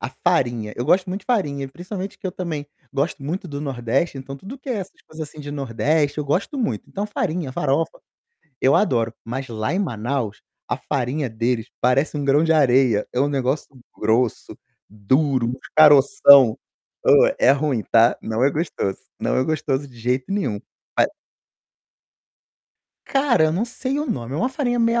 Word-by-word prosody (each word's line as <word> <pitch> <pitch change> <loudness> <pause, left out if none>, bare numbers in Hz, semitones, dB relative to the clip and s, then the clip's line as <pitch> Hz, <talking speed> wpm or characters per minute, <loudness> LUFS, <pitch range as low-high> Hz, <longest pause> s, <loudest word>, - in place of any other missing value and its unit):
A - - -3
farinha, 120 -9 0
eu 120 - -2
gosto 185 +4 +3
muito 190 +3 -3
de - - -23
farinha 145 - 0
e - - -7
principalmente 185 +6 -7
que - - -5
eu 180 - -4
também 160 -6 -4 0.3
gosto 140 0 -2
muito 180 +6 -4
do 145 -2 -6
nordeste, 135 +2 -1
então 135 +1 -8
tudo 225 - -10
que 270 - -12
é 250 - 0
essas 195 -2 -7
coisas 155 -1 -8
assim 155 - -12
de 145 0 -7
nordeste 145 +3 0
eu 150 - -1
gosto 195 - -1
muito. 230 - -2
Então 200 +1 -3
farinha, 165 -8 -2
farofa, 150 +4 -1 0.6
eu 135 - +4
adoro, 120 - +1
mas 130 +4 -4
lá 110 +4 -2
em 185 - 0
Manaus, 120 - -2 0.3
a - - 0
farinha 135 +2 -2
deles 115 +1 -1
parece 135 +5 +2
um 145 - -2
grão 140 +2 +4
de 165 0 +3
areia, 130 -7 +3
é 125 - 0
um 140 - +3
negócio 135 0 -1 0.3
grosso, 115 +1 0 0.3
duro, 130 +5 +1
uns 125 +2 -6
caroção. 140 - +7 0.5
Oh, - - +7
é 130 - +6
ruim, 140 -5 0
tá. 115 +1 +4
Não 110 +2 -2
é 140 - +4
gostoso, 150 - -2 0.2
não - - 0
é 130 - +2
gostoso 145 -3 -1
de 125 - -17
jeito 125 +7 -1
nenhum. 185 - -1 0.4
Pa - - +4 2.0
Cara, 245 - +2
não 190 +8 0
sei 260 +3 -3
o 300 - -2
nome, 130 - -4
é - - -2
uma 250 - +1
farinha 260 -3 -1
meio 230 0 +2
140 Hz, 180 wpm, -22 LUFS, 125-175 Hz, 2.0 s, caroção